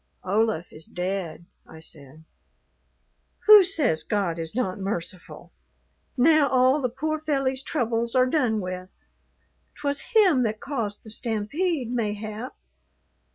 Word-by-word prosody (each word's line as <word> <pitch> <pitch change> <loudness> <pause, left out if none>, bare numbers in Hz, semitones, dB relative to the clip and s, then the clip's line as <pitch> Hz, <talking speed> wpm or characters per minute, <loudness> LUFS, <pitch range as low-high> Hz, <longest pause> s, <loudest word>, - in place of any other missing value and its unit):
"Olaf 210 -3 0
is 155 - -10
dead," 180 -2 -4 0.2
I 160 - -12
said. 155 -1 -13 1.2
"Who 425 -2 +10
says 305 - 0
God 195 -6 -1
is 165 +4 -5
not 195 -7 -1
merciful? 185 -2 -6 0.7
Now 300 +2 +5
all 260 +3 +3
the 250 - 0
poor 310 +5 -3
felly's 270 -4 -1
troubles 235 -2 -1
are 255 0 +5
done 250 -6 +1
with. 185 0 -6 0.9
'Twas 285 -1 -2
him 370 -12 +5
that 215 -2 -1
caused 230 -8 -4
the 220 - -8
stampede, 240 - -2
mayhap. 215 -2 -4
230 Hz, 120 wpm, -25 LUFS, 190-275 Hz, 1.2 s, Who